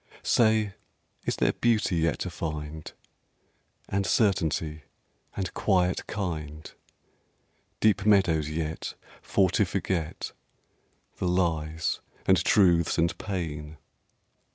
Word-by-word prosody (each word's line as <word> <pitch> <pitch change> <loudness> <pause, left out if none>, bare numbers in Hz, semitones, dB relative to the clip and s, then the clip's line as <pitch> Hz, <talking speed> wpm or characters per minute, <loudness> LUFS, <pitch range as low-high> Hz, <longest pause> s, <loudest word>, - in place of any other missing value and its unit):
Say, 110 -3 +3 0.5
is - - 0
there - - +2
Beauty 110 -6 +1
yet 80 -1 +1
to - - -3
find? 75 -1 -5 1.0
And 100 +1 0
Certainty? 80 -7 +1 0.6
and 95 -2 -3
Quiet 90 -3 +1
kind? 80 -6 -5 1.1
Deep 105 -2 +3
meadows 85 -7 +4
yet, 80 0 -4 0.3
for 95 -3 +2
to - - +3
forget 90 -4 -2 0.9
The 90 - -1
lies, 80 -3 0 0.3
and 95 -2 +4
truths, 85 -6 +4
and 85 0 +2
pain?... 80 -6 -4
85 Hz, 100 wpm, -27 LUFS, 80-95 Hz, 1.1 s, meadows